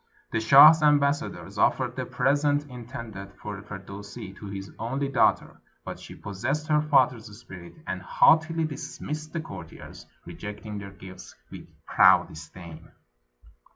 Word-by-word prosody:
The 115 - 0
shah's 145 +7 +8
ambassadors 145 -1 +1
offered - - +1
the - - -4
presents 145 +1 +1
intended 115 -6 -9
for 100 0 -8
Firdusi 100 -1 -9
to 100 - -10
his 95 0 -7
only 135 +5 -2
daughter, - - +1 0.2
but - - -7
she - - -11
possessed 125 +10 -3
her 150 -1 +3
father's 130 -6 +2
spirit, 95 -7 -12
and 95 0 -4
haughtily 160 - +3
dismissed 155 0 -6
the 165 - -3
courtiers, 80 - -11 0.2
rejecting 105 0 -8
their 100 0 -8
gifts 95 -1 -13 0.2
with - - -10 0.2
proud - - +5
disdain. 80 +1 -12
115 Hz, 130 wpm, -26 LUFS, 100-145 Hz, 0.2 s, shah's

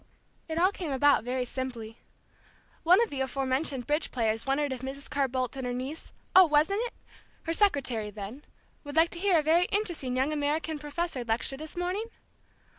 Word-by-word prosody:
It 320 0 -4
all 365 +3 +4
came 355 -7 -5
about 280 -2 +4
very 250 +1 -1
simply. 240 -3 -6 0.8
One 355 +4 +6
of 465 - -4
the 275 -2 -3
aforementioned 265 0 -1
bridge 300 +2 0
players 225 -1 -1
wondered 275 0 +1
if 250 - -7
Mrs. 270 +1 -6
Carr 280 -1 0
Bolt 255 -1 -2
and 260 -2 -4
her 245 - -2
niece 270 +6 -6 0.2
oh, 375 -1 +9
wasn't 310 +8 +3
it? - - -13 0.5
her 330 - -1
secretary 270 - +1
then, 210 +7 -8 0.4
would 290 -1 -8
like 325 +1 +4
to 345 - -7
hear 380 -2 +3
a 310 - +2
very 330 +4 +4
interesting 345 -12 -1
young 270 +4 +1
American 300 +1 -1
professor 295 -2 -3
lecture 235 +3 0
this 310 +4 -8
morning? 365 +5 -1
285 Hz, 185 wpm, -29 LUFS, 255-330 Hz, 0.8 s, oh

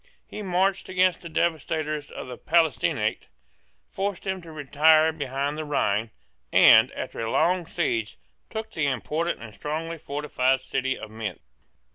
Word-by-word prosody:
He - - -8
marched 190 0 0
against 185 -1 +2
the 170 - -8
devastators 155 -2 -1
of - - -7
the 125 - -6
Palatinate, 160 -1 +1 0.6
forced 200 -1 -3
them 190 -1 -3
to 165 -1 -11
retire 155 +2 +4
behind 145 0 -3
the - - -2
Rhine, 115 -7 0 0.4
and, - - +7
after - - -6
a 115 0 -2
long 175 +6 +2
siege, 115 -11 -1 0.3
took 220 0 -5
the 155 -3 0
important 150 +3 -2
and 110 -2 -10
strongly 160 +9 -4
fortified 135 -3 0
city 130 0 -2
of - - -9
Mentz. 110 -6 -5
155 Hz, 145 wpm, -25 LUFS, 130-170 Hz, 0.6 s, and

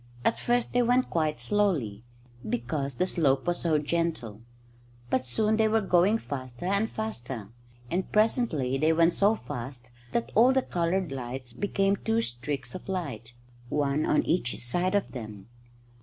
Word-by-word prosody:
At - - +2
first 240 0 +1
they 245 - +4
went 245 +2 +2
quite 155 -2 0
slowly, 155 - 0 0.5
because 135 +3 -2
the 180 - +1
slope 140 -8 +1
was 175 0 0
so 160 -3 +2
gentle. 150 -9 -2 0.7
But 130 0 +1
soon 215 - +1
they 220 -1 +4
were 220 +1 +3
going 190 +1 +3
faster 130 - -6
and 200 +4 +1
faster; 125 - -5 0.4
and 185 +2 -1
presently 195 - +2
they 155 +2 +4
went 165 +1 +4
so 205 +3 +3
fast 125 - -7 0.2
that 120 0 -1
all 245 +4 +6
the 265 -1 +2
coloured 175 -1 -1
lights 125 -1 -6
became 195 +5 +1
two 225 +2 0
streaks 130 - -4
of 185 +1 -8
light, 130 - -4 0.4
one 145 +1 +1
on 150 - +3
each 160 -7 0
side 175 +11 0
of 200 - 0
them. 110 -6 -8
160 Hz, 155 wpm, -28 LUFS, 125-200 Hz, 0.7 s, all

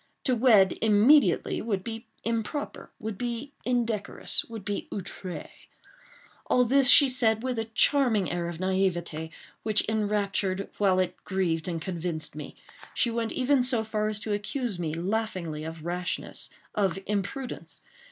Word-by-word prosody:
To 260 - +2
wed 220 -6 +5
immediately 225 +7 +4
would 200 -4 -2
be 225 +1 -6 0.2
improper—would 225 -2 -4
be 245 +4 -4
indecorous—would 230 -2 -1
be 205 -1 -3
outre. 185 -2 -5 1.0
All 250 0 +4
this 270 +2 +4
she 275 +3 +9
said 230 -3 +2
with 255 -3 -1
a 225 - -1
charming 225 - +3
air 175 -1 -2
of 170 -1 -6
naivete 175 -4 0 0.3
which 215 -1 +2
enraptured 205 -3 0
while 195 -3 +4
it 185 -1 -1
grieved 175 -4 -1
and 170 -2 -2
convinced 170 -2 -4
me. 150 - -7 0.4
She 240 - +3
went 230 -1 -2
even 265 +1 +3
so 245 -3 +1
far 215 -1 -1
as 215 -1 -1
to 215 - -2
accuse 205 0 -2
me, 160 -2 -2
laughingly, 180 -4 -2
of 160 0 -7
rashness—of 180 +2 -3
imprudence. 210 +6 -3
210 Hz, 135 wpm, -28 LUFS, 185-235 Hz, 1.0 s, she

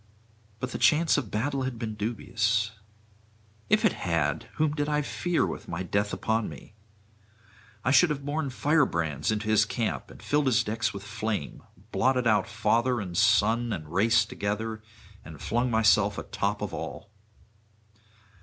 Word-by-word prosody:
But 125 0 -4
the - - -4
chance 160 +2 +4
of 130 -8 -1
battle 135 +7 -1
had 130 -2 -3
been 110 -2 -4
dubious. 105 0 0 1.0
If - - +3
it - - +4
had! 85 +3 -1
whom 155 -1 +1
did 145 -1 -1
I 150 0 +1
fear 175 +4 0
[604 - - -2
635]with - - -20
my 85 +2 -4
death 100 +3 0
upon 110 0 -1
me? - - -12 1.1
I 125 - +3
should 175 +4 +6
have 140 -2 -3
borne 145 0 -1
firebrands 120 - +1
into 110 0 -2
his 110 -1 +4
camp 110 +1 -3
and - - -13
filled 145 -1 +1
his 125 -4 +3
decks 110 0 -1
with 100 -1 -8
flame, 110 -7 -4 0.3
blotted 130 -1 +2
out 105 -4 +3
father 120 +1 +1
and 90 -4 -5
son 115 +6 +3
and 80 -4 -5
race 110 +4 +4
together, 110 +2 -3 0.4
and 80 -2 -11
flung 120 +3 0
myself 105 -3 +3
atop - - -2
of - - -4
all. 100 - -6
110 Hz, 160 wpm, -27 LUFS, 105-130 Hz, 1.1 s, should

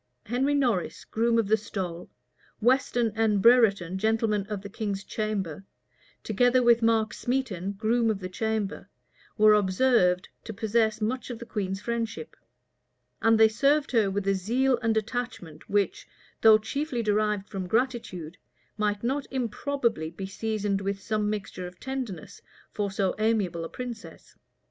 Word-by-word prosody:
Henry 265 +5 +1
Norris, 240 -10 0
groom 230 +1 +1
of 225 -3 +2
the 215 - +4
stole, 185 -5 -5 0.5
Weston 240 -1 +2
and 220 -2 +2
Brereton, 200 -5 +4
gentlemen 220 -1 +1
of 205 -2 -4
the - - -6
king's 200 -2 -4
chamber, 195 -6 -3 0.6
together 245 +4 +3
with 235 -1 +5
Mark 225 -1 +2
Smeton, 215 -7 -2
groom 230 +2 +2
of 215 - 0
the 185 -1 -6
chamber, 215 +1 -3 0.5
were 215 0 +7
observed 190 -2 +3 0.2
to 220 - -6
possess 220 0 +1
much 250 +5 -2
of 240 - -5
the 235 - -9
queen's 195 -3 -3
friendship; 235 - -4 0.9
and 225 0 +4
they 220 - +8
served 275 +6 +2
her 225 -5 +3
with 195 0 -2
a 195 - +4
zeal 240 +7 +1
and 225 -2 +1
attachment, 220 -8 -4
which, 205 -1 0 0.3
though 220 -1 +8
chiefly 245 +3 -3
derived 210 -1 0
from 190 -3 -5
gratitude, 205 -7 -2 0.4
might 210 0 0
not 270 +4 -1
improbably 240 - -1
be 180 +4 -7
seasoned 205 0 -2
with 195 0 -2
some 210 +1 -1
mixture 200 -3 -4
of 180 0 -13
tenderness 255 - -6 0.3
for 205 -1 -2
so 195 -1 0
amiable 205 -7 0
a 165 - -5
princess. 240 -3 -8
215 Hz, 150 wpm, -27 LUFS, 195-235 Hz, 0.9 s, they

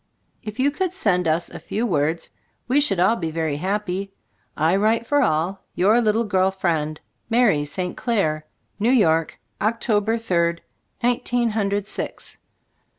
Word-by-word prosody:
If 215 +3 -8
you 280 +2 +3
could 365 +4 -2
send 180 - +1
us 160 +2 +1
a - - -8
few 225 +3 -2
words, 160 -4 -1 0.4
we 270 +4 +3
should 200 -11 +2
all 190 +6 +4
be 165 -7 -3
very 160 -2 -2
happy. 195 +2 -3 0.4
I 160 +4 +3
write 220 +3 +2
for 290 +3 +2
all. 175 - 0
Your 210 +6 +4
little 220 0 +2
girl 190 -3 +2
friend, 160 -5 -1 0.3
Mary 225 -11 +3
St. 180 +5 -4
Clare, 155 -10 -1 0.3
New 220 +3 +2
York. 165 -10 +2 0.2
October 220 0 +1
third, 170 -6 0 0.4
nineteen 240 -1 +1
hundred, 205 -2 -1
six. 210 - -6
200 Hz, 150 wpm, -22 LUFS, 170-230 Hz, 0.4 s, all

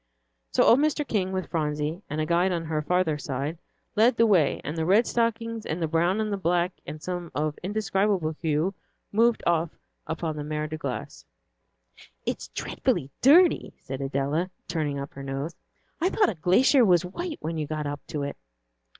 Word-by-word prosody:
So - - +4
old 240 - +6
Mr. 300 -1 +1
King, 190 -4 0
with 185 -1 -3
Phronsie 150 +1 -1
and 150 - -3
a 155 - +1
guide 175 +3 +2
on 170 -2 -2
her 155 -1 -1
farther 165 -1 +1
side, 140 +4 -3 0.4
led 225 +3 +4
the 230 - +5
way, 180 -10 +3
and 150 - -4
the 160 - -1
red 200 +8 +4
stockings 230 -1 -1
and 160 -3 -3
the 165 - 0
brown 170 +5 +2
and 215 -1 -1
the - - -1
black, 175 -1 +1 0.2
and 155 - -6
some 175 +1 -4
of 150 0 0
indescribable 195 -4 0
hue, 160 +3 +1 0.4
moved 230 +2 +3
off 165 -1 +1 0.3
upon 160 -1 -3
the 150 - -3
Mer 150 0 -2
de 155 +1 -4
Glace. 130 -4 -5 1.0
"It's - - -3
dreadfully 135 - -2
dirty," 330 +6 +5
said 135 +1 -6
Adela, 140 +6 -1 0.2
turning 150 -4 -1
up 140 +1 -6
her 140 - -8
nose. 135 +4 -4 0.5
"I 360 - +3
thought 410 -1 +3
a - - -5
glacier 190 - +4
was 180 -4 +4
white 320 - -5
when 160 0 -3
you 150 - -2
got 155 0 -3
up 145 0 -3
to 150 -2 -3
it." 140 - -4
170 Hz, 185 wpm, -26 LUFS, 150-205 Hz, 1.0 s, old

